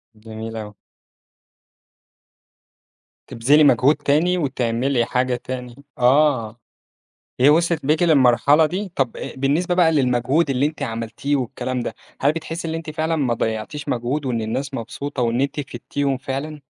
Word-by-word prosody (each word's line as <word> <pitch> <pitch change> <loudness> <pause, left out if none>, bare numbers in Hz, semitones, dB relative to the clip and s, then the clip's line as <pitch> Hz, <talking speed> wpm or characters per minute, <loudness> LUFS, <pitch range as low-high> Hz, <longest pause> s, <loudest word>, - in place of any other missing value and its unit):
جميل 110 +1 -8
أوي. 105 -1 -7 2.5
تبذِلي 145 +7 +3
مجهود 140 +1 +5
تاني 155 +5 +1
وتعملي 125 -4 0
حاجة 125 +1 0
تاني 125 0 -7 0.2
آه، 125 -3 +2 0.8
هي 130 - +6
وصلت 165 -1 +2
بيكِ 155 +3 +2
للمرحلة 145 -1 +4
دي، 185 +4 -4
طب 130 -4 0
أ - - -6
بالنسبة 150 +7 +1
بقى 175 -3 +4
للمجهود 135 +2 +1
اللي 135 +1 +2
أنتِ 155 +1 -5
عملتيه 115 +5 -2
والكلام 130 0 -3
ده، - - -4 0.3
هل 145 - +3
بتحسي 165 +1 -5
اللي 160 0 -3
أنتِ 160 -1 -6
فعلًا 160 +1 -1
ما 130 -6 +1
ضيّعتيش 110 +7 -3
مجهود، 130 +4 -2
وإن 120 -3 -1
الناس 135 +5 -3
مبسوطة، 130 +3 -4
وإن 120 +2 +1
أنتِ 140 +2 -1
فيدتيهم 135 +1 -3
فعلًا؟ 140 +3 -5
135 Hz, 140 wpm, -21 LUFS, 120-150 Hz, 2.5 s, هي